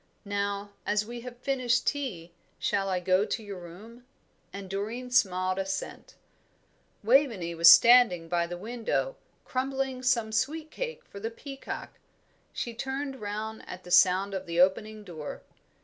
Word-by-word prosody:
Now, 200 0 -2
as 210 0 0
we 240 +1 -7
have 245 0 -9
finished 255 -2 0
tea, 195 - -3 0.3
shall 195 -1 0
I 185 -1 0
go 185 +2 +3
to 220 - -3
your 200 -3 -7
room?" 210 +8 -12 0.5
And 200 -1 -7
Doreen 220 +6 -4
smiled 185 -6 +2
assent. 195 0 -5 0.9
Waveney 225 -8 +3
was 170 0 +8
standing 235 -9 +7
by 170 0 0
the 175 0 -6
window, 235 - -2 0.3
crumbling 265 0 -2
some 240 -4 +1
sweet 310 +7 -1
cake 485 -1 -5
for 200 - -11
the 220 +3 -3
peacock. 270 +4 -8 0.5
She 235 - -4
turned 265 +2 -4
round 215 +2 -5
at 180 0 -8
the 180 - -11
sound 185 +2 +5
of 190 -1 -4
the 170 0 -2
opening 210 +4 +2
door. 160 -6 -8
210 Hz, 150 wpm, -28 LUFS, 185-250 Hz, 0.9 s, was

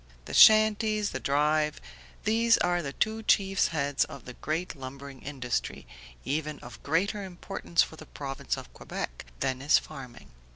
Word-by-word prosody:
The - - -8
shanties, 215 -1 +6
the - - -3
drive, 150 +2 +1 0.4
these 225 +1 +4
are 175 0 +1
the 140 -4 -4
two 220 +1 0
chief 195 -3 +3
heads 145 -3 0
of 140 - -11
the 125 - -8
great 160 +7 -3
lumbering 135 0 -9
industry, 130 - -3 0.4
even 150 +1 -2
of 120 -1 -11
greater 200 +7 0
importance 180 -1 -1
for 160 - -9
the - - -12
Province 135 -2 -4
of - - -10
Quebec - - -6 0.2
than 130 0 -1
is 145 +2 +5
farming. 125 - -9
155 Hz, 155 wpm, -28 LUFS, 135-195 Hz, 0.4 s, shanties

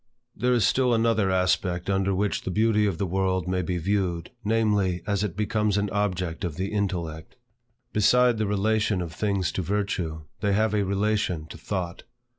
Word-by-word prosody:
There 125 +3 +1
is 115 -5 +3
still 125 -2 +3
another 115 -3 +2
aspect 90 -1 +1
under 95 0 +1
which 100 +2 0
the - - -5
beauty 105 +2 +2
of 95 -5 -2
the 100 - -1
world 95 0 0
may 90 0 0
be 90 0 -2
viewed, 90 -2 -1
namely, 105 -5 +1
as 100 -1 0
it 100 -3 -3
becomes 105 -1 +1
an 100 -1 0
object 90 -5 -1
of 85 -4 -3
the 95 +3 -3
intellect. 85 -6 -3 0.6
Beside 120 +2 +4
the 110 - +1
relation 105 0 +1
of 80 -2 -7
things 100 -1 0
to - - -2
virtue, 90 -5 -2 0.2
they 100 -1 +1
have 110 +1 +2
a 105 -1 +2
relation 100 -4 0
to - - -9
thought. 90 -3 -4
100 Hz, 180 wpm, -26 LUFS, 90-105 Hz, 0.6 s, Beside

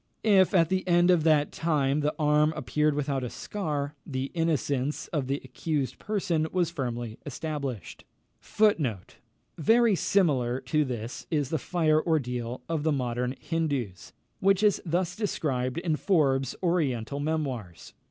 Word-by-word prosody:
If, 195 -4 +4
at 165 -3 +4
the 185 0 -1
end 175 0 +5
of 170 -4 +3
that 150 -2 +3
time, 150 -4 +1
the 150 0 0
arm 150 0 +3
appeared 150 -1 0
without 140 -2 -1
a 125 - -3
scar, 150 - -3
the 135 -1 -4
innocence 150 -4 -1
of 145 -6 -2
the 140 +2 -1
accused 130 0 -3
person 175 -7 -1
was 175 -3 +1
firmly 120 -7 -4
established. 140 - -5 1.6
Very 225 +4 +4
similar 135 -11 +1
to 155 -1 +1
this 120 -3 -5
is 145 -5 0
the 160 - 0
fire 155 -1 +2
ordeal 125 -7 -2
of 165 -2 -1
the 155 +1 +1
modern 125 -1 -1
Hindoos, 130 - -3 0.3
which 195 +1 +3
is 210 -1 +3
thus 175 +1 -1
described 135 - -2
in 170 -2 0
Forbes's 135 - +1
Oriental 140 -7 0
Memoirs, 140 - -3
vol. - - -40
150 Hz, 140 wpm, -27 LUFS, 130-170 Hz, 1.6 s, end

